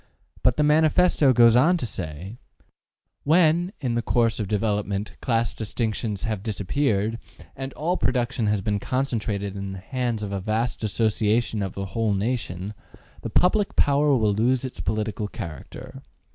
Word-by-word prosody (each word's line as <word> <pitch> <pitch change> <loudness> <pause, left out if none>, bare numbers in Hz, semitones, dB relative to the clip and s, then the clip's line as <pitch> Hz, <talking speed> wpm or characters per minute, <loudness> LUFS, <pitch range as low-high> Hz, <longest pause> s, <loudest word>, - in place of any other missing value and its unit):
'' - - -28
But 125 -1 +3
the 150 - +3
Manifesto 155 0 +4
goes 120 -2 +6
on 165 +9 +5
to 160 - -3
say: 95 +2 -6 0.8
When, 170 +3 +3
in 125 -5 -1
the 120 - 0
course 115 0 +1
of 105 - -2
development, 105 -1 -1
class 115 -2 0
distinctions 110 -1 -3
have 110 -4 -2
disappeared, 110 +1 -1 0.4
and 135 0 -5
all 175 +4 -1
production 120 -3 0
has 105 -1 +1
been 105 +1 -1
concentrated 105 -6 -2
in 100 -1 -5
the - - -6
hands 120 +2 -3
of 100 - -4
a 100 -1 -3
vast 110 +4 -2
association 110 +1 +1
of 95 -2 -4
the 100 - -3
whole 110 +1 0
nation, 100 -3 -3 0.5
the - - -4
public 200 +3 +2
power 145 -1 +3
will 105 -3 +2
lose 125 +5 +1
its 130 - -7
political 110 -1 -2
character. 80 -7 -8
115 Hz, 160 wpm, -24 LUFS, 100-130 Hz, 0.8 s, goes